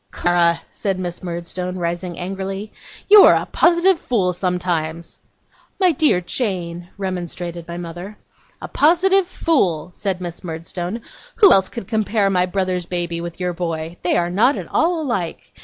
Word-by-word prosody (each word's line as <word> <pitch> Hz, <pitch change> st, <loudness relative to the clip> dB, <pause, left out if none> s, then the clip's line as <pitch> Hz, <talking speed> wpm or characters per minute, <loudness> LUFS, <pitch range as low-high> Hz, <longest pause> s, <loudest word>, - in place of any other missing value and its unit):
'Clara!' 170 Hz, -, +2 dB
said 195 Hz, -2 st, -2 dB
Miss 175 Hz, -2 st, -5 dB
Murdstone, 180 Hz, +1 st, -5 dB
rising 175 Hz, 0 st, -3 dB
angrily, 195 Hz, +3 st, -5 dB, 0.3 s
'you 415 Hz, 0 st, +9 dB
are -, -, +7 dB
a -, -, 0 dB
positive 345 Hz, +1 st, +3 dB
fool 190 Hz, -7 st, 0 dB
sometimes.' 175 Hz, -3 st, -2 dB, 0.6 s
'My 370 Hz, -2 st, +5 dB
dear 295 Hz, -, +3 dB
Jane,' 175 Hz, -4 st, -3 dB
remonstrated 175 Hz, -3 st, -5 dB
my 170 Hz, 0 st, -6 dB
mother. 175 Hz, +4 st, -8 dB, 0.5 s
'A -, -, -4 dB
positive 360 Hz, +5 st, +3 dB
fool,' 180 Hz, -, 0 dB
said 190 Hz, -2 st, -2 dB
Miss 175 Hz, -2 st, -7 dB
Murdstone. 175 Hz, +5 st, -5 dB, 0.3 s
'Who 400 Hz, -5 st, +7 dB
else 190 Hz, -1 st, +3 dB
could 235 Hz, -6 st, -7 dB
compare 215 Hz, -2 st, +1 dB
my 180 Hz, -1 st, +2 dB
brother's 185 Hz, -2 st, -2 dB
baby 170 Hz, -1 st, -3 dB
with 170 Hz, 0 st, -7 dB
your 180 Hz, -1 st, -1 dB
boy? 165 Hz, -1 st, -4 dB
They 175 Hz, -, +1 dB
are 175 Hz, 0 st, 0 dB
not 235 Hz, +10 st, +3 dB
at -, -, -6 dB
all 330 Hz, 0 st, +1 dB
alike. 195 Hz, -, -4 dB
180 Hz, 155 wpm, -20 LUFS, 175-215 Hz, 0.6 s, you